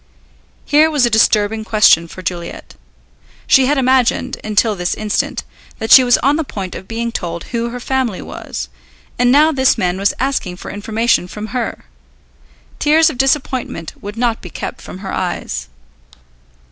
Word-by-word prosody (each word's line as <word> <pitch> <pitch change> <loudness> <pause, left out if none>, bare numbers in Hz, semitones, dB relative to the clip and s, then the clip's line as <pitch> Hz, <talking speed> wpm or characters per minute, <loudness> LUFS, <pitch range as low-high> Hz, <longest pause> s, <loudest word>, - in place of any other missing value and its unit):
Here 305 +2 +4
was 295 -5 +2
a 240 - 0
disturbing 220 0 +2
question 210 -6 +4
for 185 +2 -10
Juliet. 170 0 -6 0.7
She 265 -1 +5
had 290 +1 +2
imagined, 260 -1 +1
until 215 0 +1
this 180 -2 -2
instant, 215 -1 -2 0.3
that 220 -1 -4
she 260 - +10
was 245 -1 +4
on 280 +3 +3
the 325 - 0
point 195 -9 -6
of 190 - -9
being 230 +1 -3
told 170 -5 -4
who 235 0 -1
her 245 +1 -6
family 255 -5 -1
was, - - -6 0.5
and 245 0 +4
now 300 +4 +5
this 265 -4 +2
man 185 -3 -1
was 200 +1 +1
asking 260 -9 -1
for - - -8
information 215 -1 0
from 210 +3 -7
her. 245 -2 -3 0.9
Tears 315 +2 +4
of 250 - -11
disappointment 265 - -1
would 205 +2 -7
not 235 -1 0
be 180 - -9
kept - - -6
from - - -9
her 190 - -4
eyes. 65 - -3
230 Hz, 165 wpm, -17 LUFS, 195-260 Hz, 0.9 s, she